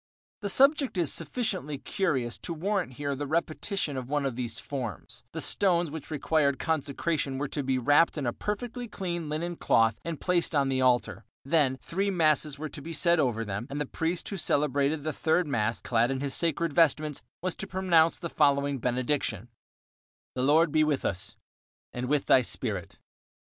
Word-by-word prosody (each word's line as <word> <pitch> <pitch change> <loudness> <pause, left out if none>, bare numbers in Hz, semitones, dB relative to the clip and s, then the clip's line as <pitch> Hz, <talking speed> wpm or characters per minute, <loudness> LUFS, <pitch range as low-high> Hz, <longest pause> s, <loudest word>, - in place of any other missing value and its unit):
The 200 - -2
subject 275 0 +3
is 170 -5 +2
sufficiently 185 - -2
curious 135 - -1
to 170 - -5
warrant 185 -3 -1
here 145 +2 -3
the 145 +1 -4
repetition 160 0 -1
of 130 -1 -5
one 145 -1 0
of 135 -3 -2
these 120 -2 -2
forms. 125 - -6
The - - -5
stones 175 -5 +2
which 160 -2 -7
required 150 -2 +1
consecration 150 -2 -1
were 145 +2 -2
to 145 - -2
be 135 -1 0
wrapped 145 +7 +4
in 145 - -2
a 120 - 0
perfectly 240 - -4
clean 175 -6 -4
linen 170 +3 -3
cloth 115 -1 +3
and 165 -3 -4
placed 175 -3 0
on 140 -2 +2
the 130 -1 +1
altar. 125 -1 +2 0.2
Then 140 -3 +2
three 195 +4 -1
masses 155 -5 +2
were 155 +2 -4
to 145 - -8
be 165 +3 -7
said 170 +1 +3
over 115 -5 +1
them, 105 +4 -4
and 145 - -4
the 150 - -1
priest 165 +5 -2
who 200 - -4
celebrated 145 -2 +1
the 155 0 -2
third 160 +5 +1
mass, 115 -6 -1
clad 120 -1 +2
in 135 -1 -1
his 140 -1 -2
sacred 165 -1 0
vestments, 155 -3 +2 0.2
was 185 -2 0
to - - -5
pronounce 170 -3 +3
the 170 - -4
following 140 -3 +2
benediction: 125 -3 -1 0.8
The 125 - -2
Lord 150 +4 +4
be 155 0 +4
with 150 -3 0
us. 95 0 -3 0.6
And 125 0 -3
with 145 +1 +1
thy 130 - +6
spirit. 105 -7 -4
150 Hz, 185 wpm, -28 LUFS, 130-170 Hz, 0.8 s, thy